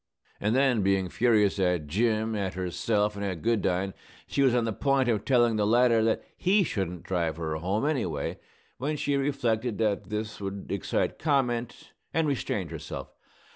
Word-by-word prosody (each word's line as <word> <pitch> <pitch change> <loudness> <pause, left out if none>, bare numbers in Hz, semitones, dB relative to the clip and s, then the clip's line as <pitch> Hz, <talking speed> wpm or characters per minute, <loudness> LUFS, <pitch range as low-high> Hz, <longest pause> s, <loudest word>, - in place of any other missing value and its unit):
And 105 +3 +1
then, 130 -4 +3
being 95 -1 +1
furious 105 -2 +2
at 90 -4 +1
Jim, 110 +6 0
at 95 -3 -2
herself, 100 +4 0
and 100 - -4
at 95 -5 -3
Goodine, 95 -4 +1 0.3
she 140 - -1
was 130 -3 +4
on 120 -2 +2
the 110 - -1
point 135 +2 +1
of 110 -4 +1
telling 120 -4 +3
the 105 -1 +2
latter 115 0 +4
that 110 0 +1
he 195 +2 +3
shouldn't 95 - -3
drive 85 -4 -1
her 80 -2 -2
home, 95 - -1
anyway, 105 - -1 0.4
when 150 +4 -1
she 145 0 0
reflected 125 -5 0
that 105 -2 0
this 105 0 -4
would 100 0 -5
excite 100 -4 -1
comment, 125 -6 -1 0.2
and 160 -1 +2
restrained 130 -11 -2
herself. - - -7
110 Hz, 170 wpm, -28 LUFS, 95-125 Hz, 0.4 s, was